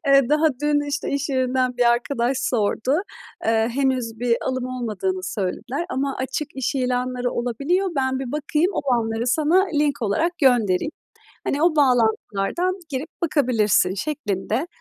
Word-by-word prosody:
Eee, 275 -2 +5
daha 305 +2 +3 0.2
dün, 290 -1 +1
işte, 285 0 -2
iş 280 +1 -1
yerinden 255 -1 0
bir 240 -1 +4
arkadaş 240 +1 0
sordu. 235 +2 0 0.5
Eee, 225 0 +2
henüz 260 -3 0
bir 240 0 +2
alım 255 -1 -1
olmadığını 215 -7 -3
söylediler 200 - -3
ama 275 -2 -1
açık 265 +3 -3
iş 265 +2 -1
ilanları 250 -1 -1
olabiliyor. 280 - 0
Ben 260 -1 +1
bir 260 -2 -5
bakayım, 300 +4 +1
olanları 235 -6 0
sana 320 +9 +3
link 290 -3 +1
olarak 230 +12 +1
göndereyim. 245 - +3 0.5
Hani, 290 +3 0
o 340 -2 +3
bağlantılardan 250 - +1
girip 285 +3 -4
bakabilirsin." 230 - +2
şeklinde 230 - -2
255 Hz, 140 wpm, -22 LUFS, 235-290 Hz, 0.5 s, Eee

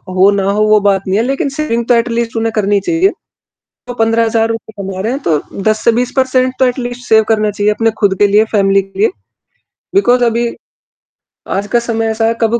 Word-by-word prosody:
हो 190 +2 +5
ना 200 -1 -1
हो 210 +1 +1
वो 215 0 +5
बात 195 -1 +1
नहीं 190 +2 +1
है 230 - +1
लेक़िन 275 +2 -1
सेविंग 275 -5 -2
तो 245 - +4
एटलीस्ट 235 0 -1
उन्हें 225 0 0
करनी 205 -1 +1
चाहिए। 335 - +1 0.8
तो 245 - -5
15 225 0 +1
हज़ार 225 0 +1
रुपए 225 -1 -5
कमा 190 -1 -6
रहे 220 - -2
हैं 275 - -4
तो 155 -3 +1 0.2
10 215 +1 0
से 235 - +6
20 245 +1 -1
पर्सेंट 255 -1 +1
तो 260 - +4
एटलीस्ट 245 -1 -3
सेव 220 0 +5
करना 215 -1 +1
चाहिए 205 +1 0
अपने 225 +1 0
ख़ुद 195 -2 +2
के 205 - +5
लिए, 210 +2 +3
फ़ैमिली 195 -2 +2
के 195 0 -14
लिए। 215 - +3 0.9
बिकॉज़ 250 -10 +3
अभी 235 +1 0 1.1
आज 200 +1 -3
का - - +5
समय 225 0 0
ऐसा 225 0 -1
है 230 - 0
कब 230 +1 +1
225 Hz, 220 wpm, -14 LUFS, 205-240 Hz, 1.1 s, से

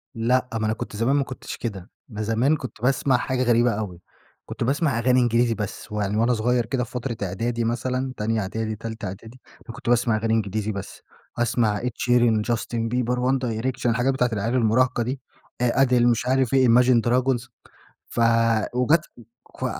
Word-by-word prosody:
لأ، 125 +3 +1
ما 110 -1 -1
أنا 110 - +1
كنت 110 - -7
زمان 120 +6 +1
ما 140 - +2
كنتش 130 - -8
كده، 100 -6 -6 0.2
ب 110 -3 -6
زمان 115 +8 +2
كنت 130 -5 -9
باسمَع 130 0 +2
حاجة 130 0 -1
غريبة 120 0 +3
أوي، 100 -5 -5 0.4
كنت - - -5
باسمَع 140 -1 +1
أغاني 125 +1 +3
إنجليزي 120 -1 +2
بس، 105 -1 -6
ويعني 105 0 -1
وأنا 120 +2 +3
صغيّر 120 +1 +1
كده 125 +1 -1
في - - -10
فترة 120 -2 -4
إعدادي 115 +5 -2
مثلًا، 130 +3 -2
تانية 110 +1 0
إعدادي، 110 +3 -3
تالتة 110 0 -7
إعدادي، 110 +7 -9 0.3
أنا 115 - -8
كنت - - -5
باسمَع 120 -2 +3
أغاني 110 +1 0
إنجليزي 110 0 -1
بس، 100 -2 -7 0.4
أسمَع 115 -3 +1
Ed - - -10 0.2
Sheeran، 120 -3 +3
Justin 115 0 -2
Bieber، 125 0 0
One 130 +2 +1
Direction، 120 +3 -3
الحاجات 120 +3 +2
بتاعة 115 -4 0
المراهقة 125 +1 +2
دي 130 +3 -4 0.4
آآ 125 +2 +3
Adele، 125 - -1
مش 120 -1 +2
عارف 130 -1 +1
إيه، 130 -1 +5
imagine 120 0 +5
dragons، 125 0 +1 0.6
ف - - -5 0.5
وجات 150 +6 +2 0.6
ف - - 0
120 Hz, 180 wpm, -23 LUFS, 110-125 Hz, 0.6 s, إيه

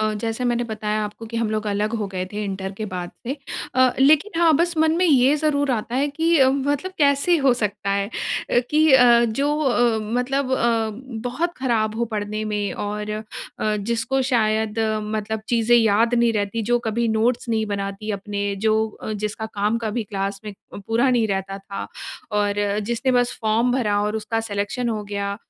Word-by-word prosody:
अ, 215 0 +1
जैसे 225 +2 -2
मैंने 240 0 +1
बताया 215 -1 -2
आपको 210 +2 -8
कि 230 +1 -6
हम 230 -2 0
लोग 215 0 -2
अलग 210 +2 -1
हो 210 -2 -2
गए 185 0 -2
थे 210 0 -3
इंटर 190 -1 -4
के 215 - -2
बाद 175 -1 -4 0.2
में। 270 +4 -2 0.4
अ, 255 -1 +4
लेकिन 310 +7 +4
हाँ, 335 -2 +6
बस 340 +1 0
मन 315 0 +4
में 365 - +2
ये 270 -2 +5
ज़रूर 285 -2 +1
आता 235 -1 -2
है 275 +3 +2
कि 325 0 +3
मतलब 280 +6 0
कैसे 285 +4 +3
हो 275 -4 +3
सकता 205 -3 -2
है 200 0 0 0.4
अ, - - +4
कि 305 -1 +4
अ, 240 -2 +7
जो 280 +7 0
अ, 240 -5 +2
मतलब 260 +2 0
अ, 230 -3 +1 0.4
बहुत 330 +8 -1
खराब 225 -4 0
हो 235 - +1
पढ़ने 210 +1 -3
में 210 -1 -2
और 210 +1 -4
अ, 215 +1 -3 0.5
जिसको 235 +5 -1
शायद 220 -3 +1 0.4
मतलब 215 0 -2
चीज़ें 235 0 +4
याद 225 +1 +3
नहीं 235 -1 +3
रहती, 210 +1 -1
जो 240 +3 +2
कभी 230 0 -1
नोट्स 230 +2 +1
नहीं 220 -1 +1
बनाती 200 +1 -4
अपने, 200 0 -3
जो 220 +2 +2 0.3
जिसका 210 +1 -4
काम 210 +1 -1
कभी 225 0 -2
क्लास 195 -1 -3
में 210 - -6 0.2
अ, - - -6
पूरा 230 +6 +1
नहीं 235 -3 +2
रहता 195 0 -3
था 195 0 -7 0.5
और 205 -1 +1 0.3
जिसने 235 +4 0
बस 245 0 +1
फॉर्म 225 +3 +2
भरा 210 -6 +1
और 210 +1 -1
उसका 225 +1 -2
सिलेक्शन 225 +4 -2
हो 215 -2 -2
गया। 200 0 -3
225 Hz, 190 wpm, -22 LUFS, 210-255 Hz, 0.5 s, अ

